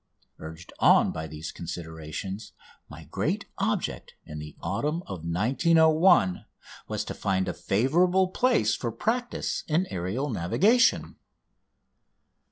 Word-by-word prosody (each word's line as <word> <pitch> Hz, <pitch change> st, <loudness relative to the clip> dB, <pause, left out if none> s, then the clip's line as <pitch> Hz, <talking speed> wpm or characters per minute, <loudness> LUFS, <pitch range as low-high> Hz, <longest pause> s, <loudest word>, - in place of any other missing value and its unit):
Urged 80 Hz, +2 st, -10 dB
on -, -, +5 dB
by 80 Hz, 0 st, -5 dB
these 75 Hz, +1 st, -7 dB
considerations, 85 Hz, +4 st, -7 dB, 0.4 s
my -, -, -10 dB
great -, -, -2 dB
object -, -, -2 dB
in 75 Hz, 0 st, -7 dB
the 75 Hz, 0 st, -9 dB
autumn 150 Hz, -, -2 dB
of 95 Hz, -3 st, -6 dB
1901 135 Hz, -, +3 dB, 0.4 s
was 105 Hz, 0 st, -3 dB
to -, -, -5 dB
find 95 Hz, -2 st, -1 dB
a -, -, -2 dB
favourable 175 Hz, -, +2 dB
place 185 Hz, -, +2 dB
for 120 Hz, -, -3 dB
practice 245 Hz, -, -2 dB
in 165 Hz, +4 st, +1 dB
aerial 100 Hz, +11 st, -2 dB
navigation. 200 Hz, -, +2 dB
105 Hz, 115 wpm, -27 LUFS, -, 0.4 s, on